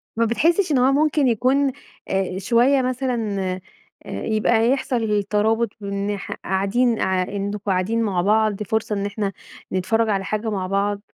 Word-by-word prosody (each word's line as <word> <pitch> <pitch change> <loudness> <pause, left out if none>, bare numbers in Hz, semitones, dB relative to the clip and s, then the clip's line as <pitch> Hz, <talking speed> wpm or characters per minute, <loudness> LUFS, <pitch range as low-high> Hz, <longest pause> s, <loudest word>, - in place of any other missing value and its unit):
ما 230 - +2
بتحسش 330 - +2
إن 280 - +3
هو 255 +2 +4
ممكن 295 -1 +2
يكون 260 +4 +2 0.4
آآ، 190 -1 -1
شوية 245 +7 +3
مثلًا 250 -5 -1 0.7
آآ - - -5
يبقى 220 +1 +2
يحصل 230 -6 0
ترابط 220 +3 +1
من 200 0 -3
ناح 205 -1 -4
قاعدين 210 +5 0
آآ 185 -1 +1
إنكم 200 +1 -2
قاعدين 200 +4 0
مع 190 -5 0
بعض، 215 +1 +2
فرصة 215 +1 -1
إن 200 0 -2
إحنا 205 -1 -3 0.4
نتفرج 220 +5 +1
على 195 -2 0
حاجة 215 +2 -2
مع 190 -3 -2
بعض؟ 200 +1 0
215 Hz, 155 wpm, -22 LUFS, 200-240 Hz, 0.7 s, هو